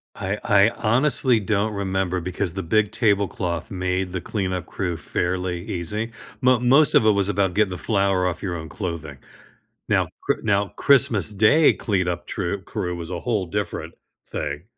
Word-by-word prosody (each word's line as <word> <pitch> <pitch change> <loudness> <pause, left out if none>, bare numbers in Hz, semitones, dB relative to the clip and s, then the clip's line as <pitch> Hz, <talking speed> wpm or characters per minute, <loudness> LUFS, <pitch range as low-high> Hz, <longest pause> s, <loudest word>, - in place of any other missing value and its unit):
I 95 +2 -3
I 100 +1 +5
honestly 125 +1 +3
don't 105 +1 0
remember 95 -2 -1
because 90 0 -2
the 95 - -3
big 105 +4 +1
tablecloth 100 -4 0
made 90 0 -2
the 90 -1 -4
cleanup 95 -3 -3
crew 90 -3 -3
fairly 90 0 -2
easy, 105 +3 -4 0.3
mo 125 -1 +4
most 135 +5 +4
of - - +5
it 110 - +6
was 100 -1 +1
about 95 -2 +1
getting 105 -2 +2
the 90 - -4
flour 100 -4 +1
off 90 - -4
your 90 -3 -2
own 80 -1 -7
clothing. 85 -7 -5 0.7
Now, - - +2 0.2
Chr - - +3
now 100 -1 +1
Christmas 125 - +4
Day 110 +10 +5
cleanup 90 -5 -2
true - - -3
crew 90 0 -4
was 85 -1 -7
a 90 -2 -4
whole 105 -5 -1
different 100 +2 -4 0.3
thing. 75 +3 -5
95 Hz, 165 wpm, -23 LUFS, 90-110 Hz, 0.7 s, it